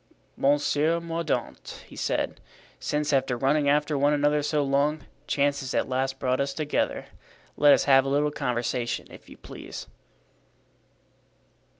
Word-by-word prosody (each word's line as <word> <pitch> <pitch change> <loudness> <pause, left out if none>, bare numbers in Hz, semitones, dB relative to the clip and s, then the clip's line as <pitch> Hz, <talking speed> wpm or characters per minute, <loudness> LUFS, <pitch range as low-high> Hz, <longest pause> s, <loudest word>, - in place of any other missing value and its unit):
"Monsieur 145 +3 +2
Mordaunt," 165 -1 -4
he - - -14
said, - - -2 0.4
"since, 150 0 -1
after 130 -2 +1
running 140 +3 +2
after 150 +1 +2
one 145 +1 +3
another 145 0 +2
so 150 0 0
long, 140 +2 0 0.2
chance 140 0 +1
has 135 0 -5
at - - +1
last 130 +1 -1
brought 130 0 0
us 140 0 -2
together, 155 -2 -1 0.5
let 145 0 +6
us - - +5
have 135 -1 +5
a 135 - -3
little 145 +2 +1
conversation, 120 -2 -2
if - - -14
you - - -13
please." - - -9
145 Hz, 140 wpm, -26 LUFS, 135-150 Hz, 0.5 s, let